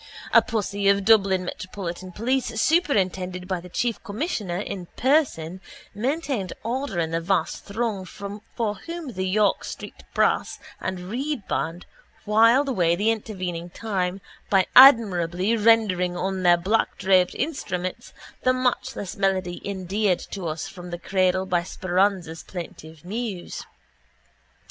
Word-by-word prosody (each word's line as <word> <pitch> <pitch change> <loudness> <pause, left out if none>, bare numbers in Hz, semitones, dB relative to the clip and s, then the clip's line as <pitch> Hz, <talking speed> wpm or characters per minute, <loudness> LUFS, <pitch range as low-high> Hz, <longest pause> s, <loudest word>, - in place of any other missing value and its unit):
A - - +9
posse 205 -2 -1
of 200 0 +3
Dublin 195 -4 +4
Metropolitan 185 -1 -6
police 235 +2 -1
superintended 185 - +1
by 185 -2 -1
the 180 +1 -11
Chief 235 +5 -2
Commissioner 205 - -3
in 190 -2 -5
person 225 - +1 0.3
maintained 260 - -2
order 240 -2 -2
in 165 -1 0
the 165 0 0
vast 170 -1 -1
throng 215 -2 -2
for 205 +3 -5
whom 335 -6 -5
the 185 0 -2
York 205 +1 +2
street - - -8
brass - - +2 0.2
and 185 -1 -4
reed 265 -2 -3
band 165 +2 -2 0.4
whiled 230 +6 +5
away 175 -10 +2
the 210 +5 +2
intervening 185 -6 -4
time 190 -2 -2 0.3
by 190 -2 +4
admirably 205 -6 +6
rendering 205 -5 +3
on 190 +1 -2
their 175 -1 +5
blackdraped 190 -1 +2
instruments 185 - -3 0.3
the 255 - +3
matchless 250 -6 -2
melody 190 -2 0
endeared 195 0 0
to 190 -4 -6
us 155 0 -3
from 180 -1 -10
the 175 - -4
cradle 185 +1 +1
by 180 -2 +1
Speranza's 185 -2 0
plaintive 165 -2 -9
muse. 205 -2 -5
195 Hz, 130 wpm, -24 LUFS, 180-225 Hz, 0.4 s, A